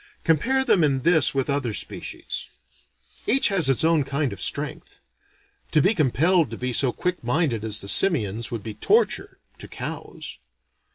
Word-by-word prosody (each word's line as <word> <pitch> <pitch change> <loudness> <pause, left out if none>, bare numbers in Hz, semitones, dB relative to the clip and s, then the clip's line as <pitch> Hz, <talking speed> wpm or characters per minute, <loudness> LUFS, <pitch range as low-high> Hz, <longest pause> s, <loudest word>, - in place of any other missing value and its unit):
Compare 260 - +2
them 180 -10 +3
in 135 -3 +1
this 160 -2 +3
with 135 -1 0
other 140 -6 -1
species. - - -7 0.8
Each 270 +4 +3
has 180 -8 +2
its 135 - +2
own 160 -2 +3
kind 140 -2 -2
of 100 - -9
strength. - - -4 0.7
To - - +5
be 190 +9 +3
compelled 160 - +2
to 115 - -7
be 125 0 -3
so 130 0 +3
quick 180 +5 -3
minded 125 -3 0
as 110 -1 +1
the 100 - -7
simians 115 - +1
would 115 -4 -5
be 110 - -6
torture, 425 - +1 0.2
to - - -8
cows. - - -7
140 Hz, 165 wpm, -24 LUFS, 120-170 Hz, 0.8 s, To